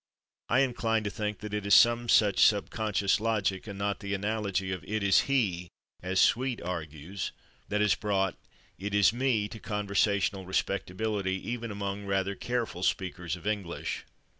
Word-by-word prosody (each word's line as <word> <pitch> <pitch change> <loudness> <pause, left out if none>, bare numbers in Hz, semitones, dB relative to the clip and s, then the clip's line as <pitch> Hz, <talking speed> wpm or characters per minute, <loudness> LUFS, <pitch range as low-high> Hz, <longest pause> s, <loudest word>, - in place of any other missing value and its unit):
I 125 +3 +4
incline 115 -4 +1
to 100 - -2
think 105 -2 -4
that 105 -1 -6
it 105 -1 -1
is 100 0 +5
some 120 0 +5
such 105 -3 +5
subconscious 105 -1 +2
logic, 105 -3 0
and 100 -2 -6
not 100 0 -1
the 100 0 -3
analogy 100 -2 -1
of 95 -2 -4
"it 110 0 -2
is 100 -1 +4
/he/," 100 -11 +1 0.3
as 95 +1 0
Sweet 125 0 +3
argues, 85 +1 -5 0.4
that 105 0 +1
has 105 -2 +4
brought 95 -3 0 0.4
"it 100 +2 -3
is 105 0 +5
/me/" 120 -4 +1
to 110 - -8
conversational 100 -3 0
respectability, 95 +1 -1
even 120 -1 -3
among 100 0 -4
rather 95 0 0
careful 115 -4 -3
speakers 90 -2 -1
of 90 - -13
English. 100 -5 -3
100 Hz, 160 wpm, -29 LUFS, 95-110 Hz, 0.4 s, is